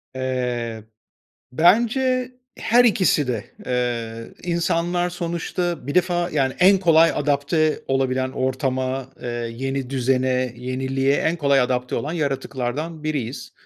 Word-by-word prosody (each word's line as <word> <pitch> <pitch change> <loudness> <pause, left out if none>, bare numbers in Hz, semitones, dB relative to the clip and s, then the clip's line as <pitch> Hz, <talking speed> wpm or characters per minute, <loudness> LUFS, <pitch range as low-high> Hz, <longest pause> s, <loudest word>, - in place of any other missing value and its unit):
Eee, 125 -3 -2 0.7
bence 245 - +3 0.3
her 240 +2 +4
ikisi 185 - +3
de. 110 -5 -2 0.2
Eee, 115 -2 -2 0.2
insanlar 175 +1 0
sonuçta 170 -1 -3
bir 145 - -3
defa, 175 -1 +1
yani, 135 -3 +1
en 190 +1 +6
kolay 165 -2 +5
adapte 145 +2 +1
olabilen 130 -1 0
ortama, 130 0 -2
eee, 120 - -4 0.3
yeni 135 0 -3
düzene, 130 -1 +1
yeniliğe 130 +2 0
en 165 - 0
kolay 140 -4 +3
adapte 125 0 -1
olan 150 +3 -2
yaratıklardan 145 +1 -3
biriyiz. 140 -5 -4
140 Hz, 115 wpm, -22 LUFS, 130-170 Hz, 0.7 s, en